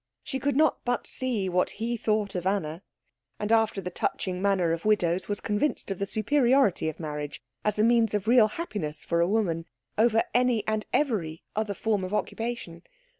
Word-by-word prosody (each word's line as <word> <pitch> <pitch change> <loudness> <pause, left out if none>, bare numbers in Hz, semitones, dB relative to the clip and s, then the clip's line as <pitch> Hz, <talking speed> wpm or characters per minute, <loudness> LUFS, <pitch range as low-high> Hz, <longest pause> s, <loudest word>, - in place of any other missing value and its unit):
She 270 -3 -4
could 285 -1 0
not 310 +2 +3
but 245 -1 -1
see 245 -7 -1
what 180 0 0
he 235 +2 -1
thought 215 -2 0
of 180 0 -2
Anna; 170 -4 -1 0.6
and 210 +1 -2
after 225 -3 +3
the 180 -1 -5
touching 180 +1 -2
manner 190 -4 +2
of 165 0 -2
widows, 185 -4 +1
was 205 - 0
convinced 210 +1 -1
of 195 - -4
the 200 - -1
superiority 240 - +2
of 155 - -8
marriage, 150 -2 -5 0.2
as 210 -1 +1
a 210 - +3
means 230 -2 +3
of 205 0 -2
real 235 -2 +6
happiness 205 - -5
for 170 0 +1
a 170 - +3
woman, 175 -6 0 0.3
over 225 0 +4
any 245 -3 +2
and 215 0 -1
every 190 - 0
other 210 -1 -1
form 210 -2 0
of 185 +3 -2
occupation. 225 -7 -3
210 Hz, 185 wpm, -27 LUFS, 180-230 Hz, 0.6 s, real